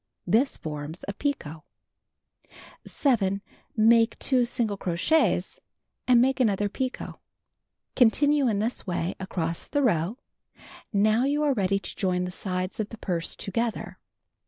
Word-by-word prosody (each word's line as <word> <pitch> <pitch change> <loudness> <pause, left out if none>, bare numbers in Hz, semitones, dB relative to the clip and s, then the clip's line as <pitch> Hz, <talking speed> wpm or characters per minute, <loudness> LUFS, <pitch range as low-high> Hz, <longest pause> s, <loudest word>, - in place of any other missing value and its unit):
This 255 +6 +2
forms 150 +2 -6
a 200 - -3
picot. 195 - -3 1.2
7. 200 -8 +1 0.3
Make 225 +1 +4
2 255 -3 +2
single 235 -3 -1
crochets, 190 - +1 0.5
and 250 -2 +6
make 265 +2 +2
another 205 -4 +2
picot. 260 +5 -4 0.8
Continue 280 +3 +4
in 215 -4 +1
this 220 +1 -2
way 175 0 -1
across 170 -3 -3
the 290 -1 0
row. 200 -1 +1 0.7
Now 215 +4 +3
you 290 +2 +1
are 290 -2 +3
ready 195 -4 +1
to 195 - -5
join 180 -2 0
the 180 - -5
sides 185 +1 -3
of 215 -1 -2
the 230 - -9
purse 175 -5 -2
together. 230 +3 -3
215 Hz, 135 wpm, -26 LUFS, 185-250 Hz, 1.2 s, and